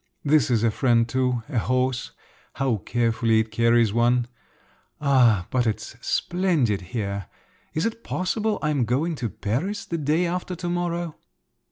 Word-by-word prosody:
This 145 Hz, -4 st, +4 dB
is 115 Hz, -3 st, +2 dB
a 115 Hz, -, +3 dB
friend 115 Hz, -1 st, +2 dB
too—a 125 Hz, 0 st, -1 dB
horse. 130 Hz, +2 st, 0 dB, 0.4 s
How 130 Hz, -4 st, 0 dB
carefully 115 Hz, +1 st, +1 dB
it 110 Hz, 0 st, -1 dB
carries 115 Hz, -1 st, +3 dB
one! 120 Hz, +1 st, +3 dB, 0.7 s
Ah, 125 Hz, -, +4 dB
but 125 Hz, -2 st, +1 dB
it's 110 Hz, -, -3 dB
splendid 165 Hz, -, +1 dB
here! 100 Hz, 0 st, -4 dB, 0.5 s
Is 155 Hz, -, 0 dB
it 230 Hz, 0 st, -3 dB
possible 210 Hz, +4 st, -1 dB
I 150 Hz, -, +1 dB
am 135 Hz, -5 st, +1 dB
going 140 Hz, +9 st, 0 dB
to 120 Hz, -3 st, -2 dB
Paris 135 Hz, -, -3 dB
the 170 Hz, -, -3 dB
day 155 Hz, +4 st, +1 dB
after 180 Hz, +1 st, -3 dB
to 175 Hz, 0 st, -4 dB
morrow?" 175 Hz, -2 st, -2 dB
125 Hz, 150 wpm, -24 LUFS, 115-165 Hz, 0.7 s, This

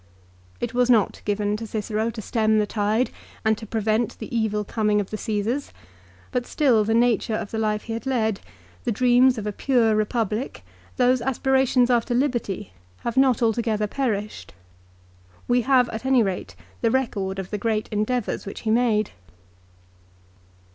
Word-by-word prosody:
It 240 Hz, 0 st, -3 dB
was 250 Hz, 0 st, +2 dB
not 225 Hz, -5 st, +3 dB
given 205 Hz, 0 st, 0 dB
to 225 Hz, 0 st, -6 dB
Cicero 215 Hz, +1 st, -2 dB
to 225 Hz, -2 st, -7 dB
stem 220 Hz, -1 st, +2 dB
the 210 Hz, -, +3 dB
tide 215 Hz, +4 st, 0 dB, 0.3 s
and 220 Hz, 0 st, +4 dB
to 220 Hz, -, -9 dB
prevent 220 Hz, +2 st, 0 dB
the -, -, -6 dB
evil 215 Hz, -2 st, 0 dB
coming 210 Hz, 0 st, +1 dB
of 200 Hz, -, -4 dB
the -, -, -2 dB
Csesars; 220 Hz, +6 st, -2 dB, 0.6 s
but 250 Hz, -2 st, -2 dB
still 250 Hz, -8 st, +3 dB
the 225 Hz, +2 st, +1 dB
nature 230 Hz, -2 st, +2 dB
of 215 Hz, -2 st, -4 dB
the 220 Hz, -, -2 dB
life 210 Hz, -1 st, 0 dB
he 225 Hz, -, -5 dB
had 230 Hz, +4 st, -5 dB
led, 220 Hz, -6 st, 0 dB, 0.4 s
the -, -, 0 dB
dreams 250 Hz, +2 st, +4 dB
of 215 Hz, -, -4 dB
a 210 Hz, -, -1 dB
pure 230 Hz, 0 st, +2 dB
Eepublic, 225 Hz, +2 st, -2 dB, 0.4 s
those 250 Hz, 0 st, +3 dB
aspira 265 Hz, +1 st, +1 dB
tions 250 Hz, 0 st, +3 dB
after 240 Hz, 0 st, +1 dB
liberty 240 Hz, -, -1 dB, 0.3 s
have 235 Hz, -, -3 dB
not 260 Hz, -3 st, +3 dB
altogether 225 Hz, -2 st, +1 dB
perished. 210 Hz, -, -3 dB, 0.9 s
We 245 Hz, 0 st, +3 dB
have 255 Hz, 0 st, +4 dB
at 220 Hz, +1 st, -5 dB
any 260 Hz, -3 st, +4 dB
rate 180 Hz, -, -4 dB, 0.3 s
the 230 Hz, -, +3 dB
record 205 Hz, -7 st, -1 dB
of 190 Hz, -1 st, -6 dB
the 210 Hz, -, -2 dB
great 215 Hz, 0 st, -1 dB
endeavours 215 Hz, +1 st, -1 dB
which 200 Hz, -, -7 dB
he 220 Hz, -, -1 dB
made. 225 Hz, -3 st, +2 dB
225 Hz, 170 wpm, -24 LUFS, 210-245 Hz, 0.9 s, and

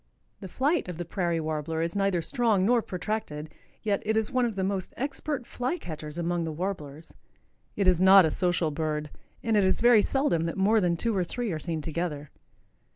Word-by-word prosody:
The 195 Hz, -, -7 dB
flight 285 Hz, -, 0 dB
of 175 Hz, -, -6 dB
the 175 Hz, -, -4 dB
Prairie 170 Hz, -1 st, -1 dB
Warbler 160 Hz, 0 st, -3 dB
is 170 Hz, +2 st, -3 dB
neither 195 Hz, -4 st, +1 dB
strong 230 Hz, -, +1 dB
nor 240 Hz, +2 st, +4 dB
protracted. 180 Hz, -7 st, -4 dB, 0.3 s
Yet 205 Hz, -3 st, 0 dB
it 220 Hz, +1 st, 0 dB
is 220 Hz, -1 st, 0 dB
one 255 Hz, -2 st, +2 dB
of 230 Hz, -3 st, -2 dB
the 190 Hz, -, -1 dB
most 190 Hz, -1 st, -3 dB
expert 280 Hz, 0 st, -3 dB
fly 250 Hz, +9 st, -2 dB
catchers 155 Hz, -, -8 dB
among 170 Hz, 0 st, -1 dB
the 160 Hz, -, -3 dB
Warblers. 155 Hz, -3 st, -5 dB, 0.6 s
It 200 Hz, -2 st, +1 dB
is 180 Hz, -1 st, +4 dB
not 190 Hz, -1 st, +8 dB
a 155 Hz, -, +1 dB
social 175 Hz, -3 st, 0 dB
bird 150 Hz, -1 st, -3 dB, 0.3 s
and 225 Hz, -2 st, +1 dB
it 205 Hz, -, +4 dB
is 190 Hz, 0 st, +2 dB
very 235 Hz, -2 st, +6 dB
seldom 235 Hz, -, +1 dB
that 165 Hz, -, -3 dB
more 210 Hz, +3 st, +3 dB
than 175 Hz, -2 st, +1 dB
two 230 Hz, +4 st, -1 dB
or 185 Hz, -, +2 dB
three 235 Hz, +5 st, -3 dB
are 160 Hz, -, -3 dB
seen 160 Hz, -1 st, -4 dB
together. 155 Hz, -3 st, -4 dB
185 Hz, 205 wpm, -27 LUFS, 165-220 Hz, 0.6 s, not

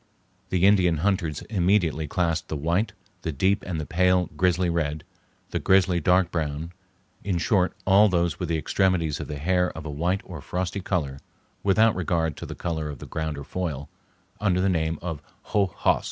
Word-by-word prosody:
The 90 Hz, 0 st, +2 dB
Indian 90 Hz, -5 st, +4 dB
hunters 85 Hz, -3 st, 0 dB
immediately 90 Hz, -6 st, +1 dB
classed 85 Hz, 0 st, 0 dB
the -, -, -3 dB
white, 85 Hz, +9 st, 0 dB, 0.3 s
the 80 Hz, -, -2 dB
deep 95 Hz, +8 st, +1 dB
and 85 Hz, -4 st, -2 dB
the 75 Hz, -, -3 dB
pale 90 Hz, +2 st, +2 dB
grizzly 90 Hz, 0 st, +2 dB
red, 80 Hz, -3 st, -1 dB, 0.5 s
the -, -, -1 dB
grizzly 95 Hz, -2 st, +3 dB
dark 90 Hz, +1 st, +3 dB
brown—in 90 Hz, +4 st, -5 dB
short, 90 Hz, +2 st, +1 dB
all 100 Hz, +3 st, +6 dB
those 85 Hz, -3 st, 0 dB
with 90 Hz, -, -3 dB
the 80 Hz, -, +1 dB
extremities 85 Hz, -3 st, +1 dB
of -, -, -5 dB
the 75 Hz, -, -5 dB
hair 90 Hz, +4 st, +1 dB
of 80 Hz, -, -7 dB
a 75 Hz, -, -4 dB
white 90 Hz, +7 st, 0 dB
or 85 Hz, -5 st, -8 dB
frosty 90 Hz, +4 st, -3 dB
color 75 Hz, -8 st, -2 dB, 0.4 s
without 110 Hz, +3 st, +4 dB
regard 85 Hz, -4 st, 0 dB
to -, -, -7 dB
the -, -, -7 dB
color 80 Hz, -3 st, -3 dB
of 75 Hz, -, -6 dB
the -, -, -9 dB
ground 80 Hz, -2 st, -3 dB
or 70 Hz, -, -6 dB
foil—under 90 Hz, +5 st, -4 dB
the 95 Hz, +1 st, +2 dB
name 80 Hz, -2 st, 0 dB
of 80 Hz, -4 st, -4 dB, 0.2 s
hoh 100 Hz, -2 st, +1 dB
host. 90 Hz, -, +1 dB
90 Hz, 180 wpm, -25 LUFS, 80-95 Hz, 0.5 s, all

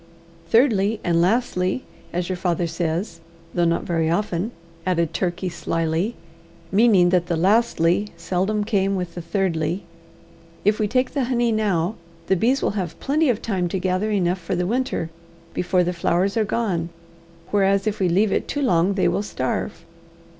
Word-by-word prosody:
Thirdly, 220 Hz, -2 st, +3 dB
and 170 Hz, -1 st, +2 dB
lastly, 185 Hz, +1 st, +1 dB, 0.3 s
as 175 Hz, 0 st, -2 dB
your 185 Hz, -, -2 dB
father 175 Hz, -1 st, 0 dB
says 165 Hz, +2 st, -2 dB, 0.3 s
though 175 Hz, -1 st, +2 dB
not 170 Hz, 0 st, +1 dB
very 165 Hz, -2 st, 0 dB
often," 180 Hz, +2 st, 0 dB, 0.3 s
added 170 Hz, -3 st, 0 dB
Turkey 180 Hz, 0 st, -1 dB
slyly, 165 Hz, +4 st, -1 dB, 0.6 s
meaning 195 Hz, -3 st, +5 dB
that 175 Hz, -1 st, +2 dB
the 170 Hz, -2 st, 0 dB
lastly 195 Hz, -1 st, +2 dB
seldom 190 Hz, +5 st, 0 dB
came 195 Hz, -2 st, +1 dB
with 180 Hz, -2 st, -3 dB
the 175 Hz, -, -6 dB
thirdly, 175 Hz, -1 st, -1 dB, 0.8 s
"if 210 Hz, +2 st, +3 dB
we 215 Hz, -, +2 dB
take 255 Hz, +4 st, +1 dB
the 275 Hz, -3 st, 0 dB
honey 240 Hz, -1 st, +1 dB
now, 205 Hz, -3 st, 0 dB, 0.3 s
the 190 Hz, -, +2 dB
bees 250 Hz, +9 st, +1 dB
will -, -, +2 dB
have 185 Hz, -5 st, -4 dB
plenty 295 Hz, +2 st, +1 dB
of 235 Hz, -2 st, 0 dB
time 190 Hz, -5 st, 0 dB
to 180 Hz, -, -2 dB
gather 185 Hz, +3 st, 0 dB
enough 185 Hz, -3 st, +1 dB
for 180 Hz, +2 st, -3 dB
the 180 Hz, 0 st, 0 dB
winter 235 Hz, -6 st, -1 dB, 0.4 s
before 180 Hz, 0 st, +1 dB
the 180 Hz, +1 st, -1 dB
flowers 175 Hz, +3 st, +1 dB
are 220 Hz, -2 st, +2 dB
gone, 190 Hz, -7 st, -1 dB, 0.6 s
whereas 195 Hz, 0 st, +3 dB
if 215 Hz, -1 st, -1 dB
we 185 Hz, -2 st, +2 dB
leave 195 Hz, +4 st, +3 dB
it -, -, 0 dB
too 290 Hz, -, -2 dB
long 185 Hz, -4 st, +3 dB
they 195 Hz, -, +2 dB
will -, -, +1 dB
starve." 165 Hz, -2 st, -3 dB
185 Hz, 170 wpm, -22 LUFS, 170-215 Hz, 0.8 s, meaning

